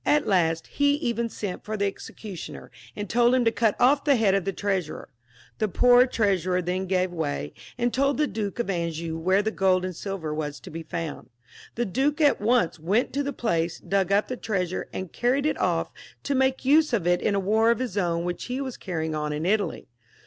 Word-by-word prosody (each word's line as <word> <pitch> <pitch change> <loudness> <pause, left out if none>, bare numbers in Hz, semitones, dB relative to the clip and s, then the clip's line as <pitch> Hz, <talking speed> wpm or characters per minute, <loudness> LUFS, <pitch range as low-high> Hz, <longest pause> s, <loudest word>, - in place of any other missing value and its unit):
At 295 -1 +2
last 165 -4 +1
he 285 0 +2
even 235 -5 -1
sent 200 -4 -5
for 215 0 -4
the 200 - +1
executioner, 195 -1 -7 0.2
and 205 0 -4
told 240 +4 +3
him 250 -2 +2
to 230 - +4
cut 225 -2 +1
off 275 +3 +4
the 285 -2 +4
head 215 -5 +3
of 195 -2 +1
the 195 - 0
Treasurer. 190 -4 -3 0.5
The 215 - +2
poor 245 +6 +5
Trea 205 -6 +1
surer 180 +2 0
then 185 +2 -2
gave 185 -1 +1
way, 75 - -3 0.2
and 240 -1 0
told 275 +1 +2
the 300 - +3
Duke 215 -6 -4
of 240 - -1
Anjou 170 -3 -2
where 185 +4 +2
the 220 - 0
gold 185 -3 +2
and 185 -1 -5
silver 180 -5 -4
was 150 -2 -4
to 185 - -10
be 165 +1 -6
found. 165 0 -6 0.5
The 240 - 0
duke 275 - 0
at 290 -7 +3
once 220 -6 +2
went 195 +10 0
to 285 - 0
the 280 0 -2
place, 170 -10 -1
dug 195 -1 0
up 200 +1 +3
the 255 - -4
treasure, 185 -6 -2
and 185 -2 -6
carried 260 +4 +1
it 305 - 0
off - - 0 0.3
to 280 - -1
make 265 0 +1
use 300 0 +4
of 205 -8 +1
it 175 0 +2
in 205 - +1
a - - +2
war 220 +4 +3
of 235 - +3
his 250 -5 -4
own 170 -4 0
which 175 0 -4
he 250 +2 -3
was 265 -3 -4
carrying 160 -4 -3
on 150 -1 -2
in 150 +2 -3
Italy. 205 +2 0
200 Hz, 220 wpm, -25 LUFS, 175-245 Hz, 0.5 s, poor